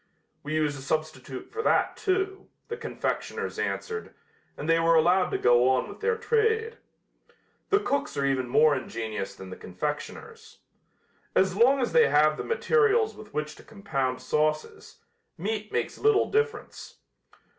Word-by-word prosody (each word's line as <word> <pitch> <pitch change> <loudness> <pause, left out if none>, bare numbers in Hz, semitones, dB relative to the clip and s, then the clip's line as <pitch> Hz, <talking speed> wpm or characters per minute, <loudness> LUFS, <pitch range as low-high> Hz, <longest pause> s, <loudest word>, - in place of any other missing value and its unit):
"We 155 +2 -4
use 150 -2 +1
a 135 - -8
substitute 140 -3 -4
for 440 - -3
that, - - +2
too," 390 -1 -1 0.2
the 465 - -3
confectioners - - -4
answered, 445 0 -4 0.4
and 150 - -5
they 165 0 +4
were 165 0 +4
allowed 180 +3 +4
to - - -1
go 120 +1 +4
on 130 -1 +1
with - - -10
their 455 +1 0
trade. 450 0 +1 0.9
The 405 - +4
cooks 280 - -2
are 140 - +1
even 130 -2 0
more 150 +3 +5
ingenious 110 -6 -5
than 95 -1 -10
the - - -8
confectioners. 90 0 -6 0.8
As 190 -1 +3
long 260 +6 +4
as 245 - 0
they 240 - +6
have 150 +2 +4
the - - -4
materials 455 -1 +2
with 210 -1 -12
which 150 0 -2
to - - -14
compound 135 -12 -3
sauces, 155 +3 -2 0.4
meat 210 +4 -3
makes - - -2
little 430 -1 +3
difference. 445 +1 -2
165 Hz, 155 wpm, -27 LUFS, -, 0.9 s, they